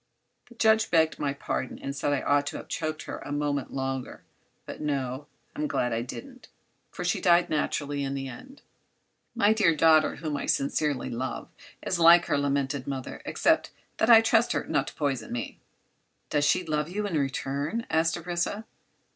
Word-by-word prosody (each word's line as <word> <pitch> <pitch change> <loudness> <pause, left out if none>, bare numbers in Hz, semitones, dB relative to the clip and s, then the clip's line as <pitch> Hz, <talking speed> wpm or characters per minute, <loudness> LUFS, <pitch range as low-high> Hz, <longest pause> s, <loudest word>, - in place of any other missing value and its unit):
The 240 - -16
judge 220 -1 +3
begged 160 -1 +2
my 140 - 0
pardon 140 -1 -4
and 140 0 -5
said 145 +1 -1
I 140 - +1
ought 145 0 +2
to - - -4
have - - -9
choked 155 0 -3
her - - -6
a - - -8
moment 145 -2 -1
longer. 135 -1 -4 0.4
But - - -8
no; 140 -1 -2 0.3
I'm 300 +1 -1
glad 125 - -1
I 115 - -1
didn't, 250 - -9 0.4
for - - -7
she - - 0
died 175 0 +4
naturally 145 -2 -1
in 135 0 -3
the 135 0 -4
end. 265 - -11 0.7
My 215 -2 +4
dear 195 -7 +3
daughter, 155 0 +4
whom 155 -3 -3
I - - -4
sincerely 140 -2 0
love, 120 +1 -4 0.3
is 180 - -1
like 170 +1 +7
her - - +1
lamented 140 -1 -1
mother, 135 -2 -5
except - - +2 0.3
that 220 - +2
I 225 -1 +9
can - - -8
trust 225 +1 +3
her - - -1
not - - 0
to - - -8
poison 140 -4 -2
me." 120 -1 -5 0.7
"Doesn't 145 -1 +2
she 185 - +2
love 150 0 -1
you 205 +3 -3
in 195 -5 -2
return?" 140 - -2
asked 165 +1 +2
Orissa. 175 +5 -3
150 Hz, 185 wpm, -27 LUFS, 140-175 Hz, 0.7 s, I